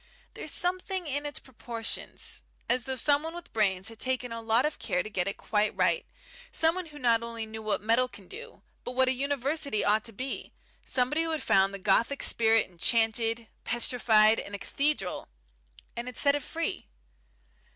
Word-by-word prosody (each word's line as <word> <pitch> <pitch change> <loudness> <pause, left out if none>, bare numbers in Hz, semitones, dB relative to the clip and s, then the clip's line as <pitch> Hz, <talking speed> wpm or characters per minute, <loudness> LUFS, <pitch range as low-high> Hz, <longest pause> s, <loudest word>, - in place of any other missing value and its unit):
There's - - -5
something 365 +2 +1
in 290 0 -1
its 290 - -4
proportions 230 -3 -5 0.3
as 245 0 +1
though 265 - -2
someone 295 +5 +1
with 345 0 -10
brains 190 -4 +1
had 225 0 -9
taken 255 -1 -2
a 230 0 -5
lot 225 +3 +2
of 300 - -2
care 180 - -1
to 215 - -7
get 180 -2 -1
it 200 - -3
quite 210 0 0
right, - - +1 0.4
someone 330 +2 +2
who 300 -1 -12
not 235 -4 +3
only 230 -1 -4
knew 220 0 -7
what 215 -1 -1
metal 230 +4 +3
can 200 -6 -12
do, 460 +4 -11 0.2
but 245 - -5
what 260 0 +3
a - - +4
University 280 -1 0
ought 215 +1 +3
to 230 - -4
be, 255 +5 -5 0.3
somebody 260 +5 +1
who 330 - +1
had 315 -1 -2
found 195 0 +4
the 200 - -5
Gothic 220 +8 +2
spirit 225 -1 +4
enchanted, 225 +4 +1 0.2
petrified, 225 -2 +4
in 200 - -6
a - - -4
cathedral, 275 -3 -1 0.7
and 235 +1 -5
had 250 - -7
set 280 -1 +4
it 290 - -1
free." 330 +5 -3
240 Hz, 180 wpm, -29 LUFS, 220-285 Hz, 0.7 s, a